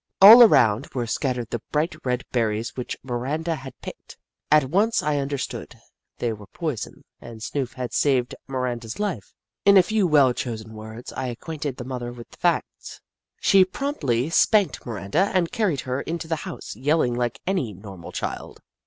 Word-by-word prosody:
All 220 +5 +11
around 115 - +5
were 120 -2 -1
scattered 125 0 -2
the 120 - -3
bright 155 +2 0
red 125 0 -1
berries 115 0 -1
which 125 - -5
Miranda 135 +7 -2
had 135 -4 -9
picked. - - -10 0.3
At 150 -1 +6
once 200 - +1
I 150 -1 +1
understood 140 -2 -4 0.2
— - - -59
they 120 -2 -1
were 105 -2 -11
poison, 155 -10 -5 0.2
and 115 -1 -10
Snoof 130 +3 -3
had 125 -2 -5
saved 130 -4 +2
Miranda's 125 -4 -3
life. 185 - -3 0.3
In 200 0 +7
a 185 - +8
few 210 0 +1
well 140 -5 +5
chosen 110 -3 -5
words, 110 +2 -9
I 130 - -3
acquainted 145 +2 -5
the 125 - -6
mother 125 -2 -5
with 120 -1 -12
the - - -16
facts. - - -2 0.4
She 195 -1 +6
promptly 165 - -1
spanked 205 +2 +3
Miranda 115 - 0
and 175 -3 +2
carried 200 - 0
her 130 +1 -3
into 165 +1 -4
the 160 0 -1
house, - - -8
yelling 135 +1 +1
like 120 -1 -2
any 180 - -1
normal 95 -3 -10
child. - - -5
130 Hz, 170 wpm, -24 LUFS, 120-165 Hz, 0.4 s, All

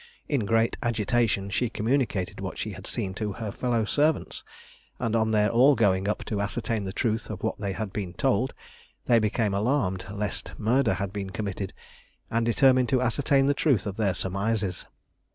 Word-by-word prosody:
In 130 -9 0
great 115 +1 +2
agitation 110 -3 +1
she 120 +5 0
communicated 110 -5 -1
what - - -5
she - - -3
had - - -8
seen 95 - -1
to 105 0 -3
her 105 +1 -5
fellow 120 0 0
servants, 150 +7 0 0.5
and 115 -1 -1
on 110 -1 +2
their 105 -1 +3
all 130 +5 +6
going 95 -4 +2
up 105 - -2
to 105 -2 -2
ascertain 110 0 -2
the 95 - -3
truth 110 +1 -1
of 105 -3 -6
what 110 - -1
they 100 -2 -2
had 105 -1 -4
been 95 -4 -4
told, 130 -1 +1 0.5
they 120 -1 +5
became 105 -1 0
alarmed 100 -3 0
lest 105 0 -3
murder 120 +3 +2
had 100 -1 -4
been 100 -2 -4
committed, 100 -1 -4 0.6
and 115 0 +1
determined 130 +1 +4
to 130 - +3
ascertain 135 +2 +2
the 140 - +3
truth 140 -5 +2
of 100 -2 -4
their 100 -5 +1
surmises. 100 0 -2
110 Hz, 180 wpm, -27 LUFS, 100-120 Hz, 0.6 s, all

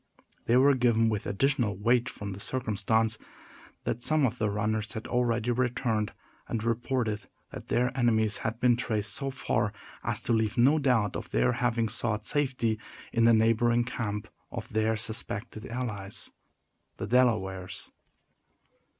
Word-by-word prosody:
They 120 - +4
were 140 +2 +6
given 120 -3 +3
with 105 -2 -2
additional 120 -1 +1
weight 120 +4 +2
from 100 -1 -6
the 95 - -9
circumstance 110 -1 +1 0.6
that 120 - -2
some 155 +1 +3
of 125 0 -2
the 110 - +1
runners 105 +1 -1
had 110 - -6
already 120 -1 +1
returned, 120 -3 0 0.4
and 110 -2 -2
reported 115 -2 -1 0.2
that - - -9
their 125 +1 +1
enemies 110 -4 +2
had 110 +1 -3
been 125 -1 +4
traced 105 -4 +1
so 135 -1 -1
far 115 -6 -1 0.3
as - - -1
to - - 0
leave 110 0 +1
no 140 +6 +5
doubt 120 -8 +2
of - - -5
their 60 +1 +2
having 115 -2 0
sought 110 -1 -2
safety 125 -6 +1 0.3
in 115 -1 +3
the 115 - +6
neighboring 115 +2 +3
camp 105 -4 -4 0.2
of - - -7
their 110 +1 +1
suspected 110 0 -3
allies, 110 -5 -4 0.7
the - - -3
Delawares. 100 -6 0
115 Hz, 150 wpm, -29 LUFS, 105-125 Hz, 0.7 s, were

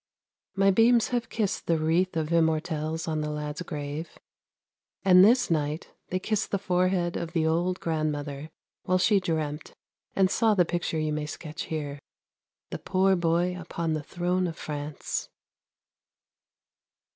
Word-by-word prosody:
My 195 0 +4
beams 230 +3 +4
have 240 -1 -1
kissed 210 -4 -2
the 165 - +3
wreath 165 +3 +1
of 155 -1 -1
Immortelles 160 -1 0
on 155 -1 -1
the 150 - -2
lad's 150 +1 -4
grave, 150 -1 -5 0.9
and 185 -1 +8
this 240 0 +4
night 150 0 -1 0.2
they 185 - -1
kissed 215 +3 -1
the 200 - 0
forehead 180 -2 +1
of 165 - -4
the 160 -2 +1
old 175 +3 +1
grandmother 150 -2 -2 0.3
while 185 - +1
she 200 +2 +4
dreamt 155 -4 -3 0.4
and 190 -1 +3
saw 220 -2 +3
the 180 -3 +4
picture 170 -1 -2
you 155 -1 -1
may 150 0 -2
sketch 160 +4 -6
here, 145 -3 -4 0.3
' - - -67
The - - -4
poor 190 0 +2
boy 175 +1 +1
upon 170 -2 -3
the 155 - -1
throne 180 +4 -1
of 165 -1 -6
France 145 0 -4
165 Hz, 150 wpm, -27 LUFS, 155-185 Hz, 0.9 s, and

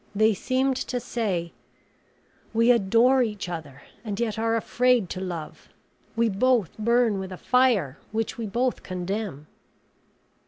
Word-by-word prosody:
They 215 +1 +4
seemed 260 +5 0
to 250 -1 -3
say, 210 -9 -2 1.0
We 230 +2 +5
adore 235 +4 +4
each 210 -5 -2
other 145 -6 -7 0.2
and 210 -2 -4
yet 220 -2 -1
are 225 0 +1
afraid 240 -3 +2
to 185 - -4
love; 175 -4 -6 0.5
we 230 0 +2
both 225 -1 +1
burn 235 -2 +2
with 190 0 -6
a 185 - -6
fire 230 - +2
which 220 0 -2
we 230 -2 -4
both 245 +5 -1
condemn. 185 -4 -4
220 Hz, 140 wpm, -25 LUFS, 190-245 Hz, 1.0 s, We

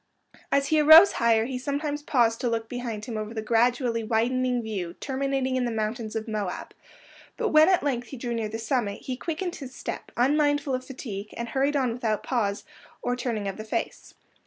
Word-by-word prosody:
As 280 0 +2
he 310 - +4
arose 315 +6 +9
higher, 225 -1 +2
he 255 0 -4
sometimes 290 +2 -2
paused 235 -6 +2
to 245 - +1
look 225 -1 -2
behind 235 -4 -5
him 235 -4 -5
over 215 +2 -5
the 220 - -2
gradually 235 +1 +2
widening 245 +2 +1
view 190 -6 -4
terminating 270 -1 -1
in 250 - 0
the - - 0
mountains 220 0 -3
of 220 0 -3
Moab; 210 -4 -4 0.6
but 465 -2 0
when 310 +1 +6
at 370 -5 +3
length 245 -4 -1
he 270 - -8
drew 240 0 -3
near 225 -2 -2
the 220 - -4
summit, 225 -3 -1
he 255 - -4
quickened 340 +6 -4
his 265 -3 -9
step, - - -6
unmindful 290 +2 +2
of 255 0 -1
fatigue, 215 -6 -7
and 235 0 -4
hurried 275 +2 +1
on 255 -4 +1
without 225 -3 -1
pause 210 -5 -1 0.4
or 245 0 0
turning 235 -5 -3
of 195 - -4
the 215 - -6
face. 220 - -4
245 Hz, 200 wpm, -26 LUFS, 225-275 Hz, 0.6 s, arose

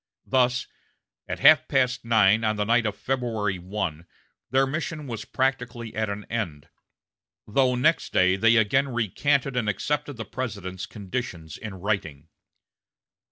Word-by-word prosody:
Thus, 125 -1 +2 0.6
at - - -5
half - - +7
past 130 -1 +1
nine 110 -1 +4
on 110 0 +1
the 105 - 0
night 115 +1 +2
of 105 - -4
February 115 -7 -2
1, 90 -3 -4 0.4
their 135 +3 +3
mission 155 +2 -4
was 115 -4 -6
practically 125 -4 -2
at 110 -1 -1
an 100 0 -5
end, 85 -11 -4 0.8
though 125 +3 +2
next 155 +7 +2
day 95 0 +4
they 115 +4 +4
again 110 +5 +3
recanted 130 +4 0
and 115 -4 0
accepted 145 +5 -2
the 115 - -5
President's 95 -7 -5
conditions 95 -6 -6
in 105 -3 -7
writing. 85 -7 -3
115 Hz, 140 wpm, -25 LUFS, 100-130 Hz, 0.8 s, half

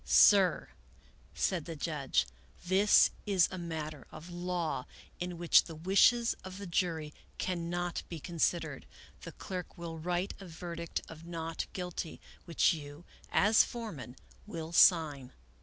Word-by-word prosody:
Sir," 195 -3 +5 0.7
said 175 -6 0
the 165 - -6
judge, 140 - 0 0.2
" - - -25
this 195 +3 +5 0.2
is 190 -4 +4
a 185 - -5
matter 155 -4 -6
of 160 +3 -10
law 175 -6 -3 0.3
in 180 -1 -4
which 170 0 +5
the 165 - -8
wishes 200 +8 +4
of 185 0 -8
the 200 - -7
jury 165 -4 -1 0.2
cannot 175 -1 -2
be 170 - -6
considered. 170 +1 -1 0.3
The - - -8
clerk 185 -3 -7
will 165 -1 -6
write 180 +3 -2
a 195 - -10
verdict 170 0 -5
of 160 0 -11
not 165 -1 -4
guilty, 180 -3 -5 0.3
which 170 0 +3
you, 150 +1 -9 0.3
as 215 +2 +5
foreman, 190 - -7 0.3
will 165 -5 -6
sign." 155 -7 +4
170 Hz, 140 wpm, -32 LUFS, 160-180 Hz, 0.7 s, Sir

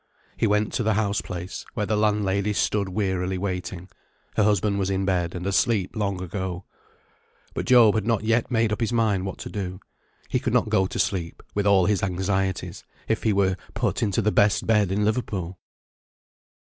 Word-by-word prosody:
He 115 - +1
went 105 0 +1
to - - 0
the 110 -2 +1
house 105 -2 0
place, 90 +1 -6
where 105 - 0
the 110 - 0
landlady 105 -1 +1
stood 100 -1 0
wearily 95 -2 -1
waiting. 90 -1 -4 0.5
Her - - +2
husband 100 -1 +2
was 95 -1 0
in 95 0 0
bed, 90 -3 0
and 90 0 -5
asleep 100 0 +1
long 100 -3 -1
ago. 95 0 -4 0.9
But - - -4
Job 120 -4 +7
had 110 -1 -1
not 115 -3 +1
yet 115 +2 +1
made 115 -3 +1
up 105 - -4
his 115 -1 0
mind 105 -5 +1
what 95 - -5
to - - -7
do. 95 -3 -4 0.5
He - - 0
could - - -2
not - - +2
go 95 0 +2
to - - -6
sleep, 85 -4 -2
with 100 0 0
all 95 -3 +5
his 100 0 +1
anxieties, 95 0 -1 0.2
if 110 - 0
he 110 - +2
were 95 -2 +2 0.2
put - - 0
into 100 -4 +1
the 105 - +2
best 100 -1 +3
bed 105 -4 +3
in 105 +2 +1
Liverpool. 100 -6 -2
100 Hz, 190 wpm, -25 LUFS, 95-105 Hz, 0.9 s, Job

